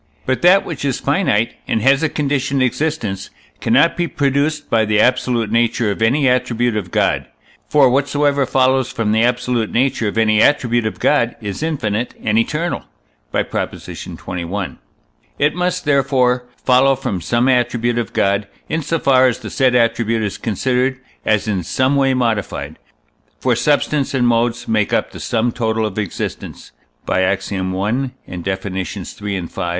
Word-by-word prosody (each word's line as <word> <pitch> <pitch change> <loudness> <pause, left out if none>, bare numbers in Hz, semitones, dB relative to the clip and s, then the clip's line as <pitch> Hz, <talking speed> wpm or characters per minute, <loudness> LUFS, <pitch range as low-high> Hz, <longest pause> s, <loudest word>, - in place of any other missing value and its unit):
But 130 0 -1
that 185 +3 +5
which 160 -5 -6
is 135 -3 -1
finite, 140 - +1
and - - +1
has 135 +2 +4
a 160 - +1
conditioned 140 -2 0
existence, 130 -8 -2 0.3
cannot 165 - +3
be 175 0 -1
produced 145 +1 0
by 115 -1 +2
the 105 -1 +1
absolute 125 -2 +1
nature 115 -1 +1
of 100 - -5
any 130 +5 +3
attribute 120 -2 +1
of 100 -4 -3
God; - - 0 0.4
for 145 -3 +5
whatsoever 140 +1 +1
follows 130 -1 +2
from 115 -5 -1
the 110 +1 +3
absolute 125 -1 0
nature 125 -2 +1
of 105 - -3
any 110 -1 +3
attribute 120 -5 +2
of 110 - -6
God 120 0 +2
is 105 0 -5
infinite 120 -8 -2
and 110 0 +2
eternal 155 +9 -2 0.5
(by - - +1
Prop. - - -3
xxi.). 90 +2 -6 0.6
It 145 +1 +2
must, 180 +1 -1
therefore, 130 -3 +2 0.2
follow 135 +1 +4
from 95 -8 -3
some 120 +8 +1
attribute 120 -2 +1
of 115 - -3
God, 100 +1 +1 0.2
in 160 - -1
so 160 +3 -1
far 130 -3 +4
as 125 - 0
the - - -8
said 130 -2 +2
attribute 115 -1 +1
is 100 - -3
considered 125 +4 0 0.2
as 110 0 +1
in 100 -4 0
some 130 - 0
way 135 -1 +2
modified; 115 -6 -2 0.6
for - - +1
substance 145 -1 +1
and 125 -2 +2
modes 115 0 +1
make 110 -2 +1
up - - 0
the - - -10
sum 120 +1 0
total 110 -2 -1
of 105 -1 -3
existence 100 -5 -5 0.3
(by 95 - +1
Ax. 95 +1 0
i. - - -2
and 100 +1 -3
Def. 95 +1 -3
iii., 95 -1 -2 0.6
v.) 85 - -7
120 Hz, 165 wpm, -18 LUFS, 110-135 Hz, 0.6 s, that